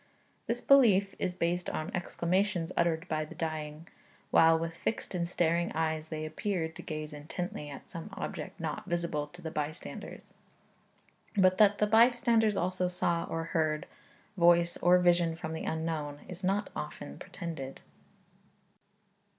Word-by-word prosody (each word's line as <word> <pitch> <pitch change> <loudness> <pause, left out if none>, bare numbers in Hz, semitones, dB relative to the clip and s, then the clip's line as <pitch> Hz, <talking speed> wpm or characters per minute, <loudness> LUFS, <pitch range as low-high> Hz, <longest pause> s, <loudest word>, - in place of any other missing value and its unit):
This 240 +1 -1
belief 205 -8 +5
is 180 - -1
based 175 0 0
on 155 +5 -3
exclamations 180 0 0
uttered 170 0 +1
by 155 -2 -1
the 155 - -10
dying, 155 0 -4 0.4
while 165 0 +6
with 165 0 -3
fixed 205 +6 -3
and 170 -2 -1
staring 170 0 +1
eyes 160 -1 -1
they 155 -1 -4
appeared 160 0 -2
to - - -7
gaze 155 -1 -5
intently 150 +1 -5
at 140 - -10
some 170 +4 -7
object 165 -5 -6
not 160 -2 -4
visible 170 -4 -1
to 175 +4 -14
the 160 - -4
bystanders. 155 +2 -6 1.0
But 185 -1 +4
that 205 -1 +6
the 210 - +3
bystanders 230 -1 +4
also 185 0 0
saw, 175 -1 0
or 165 0 -3
heard, 155 -2 +1 0.5
voice 170 0 +5
or 180 +1 +5
vision 175 -2 +3
from 160 -1 -5
the 160 - -4
Unknown, 160 -3 -3
is 180 +1 -9
not 200 +3 0
often 75 -1 -6
pretended. 155 -6 -6
170 Hz, 145 wpm, -31 LUFS, 155-185 Hz, 1.0 s, while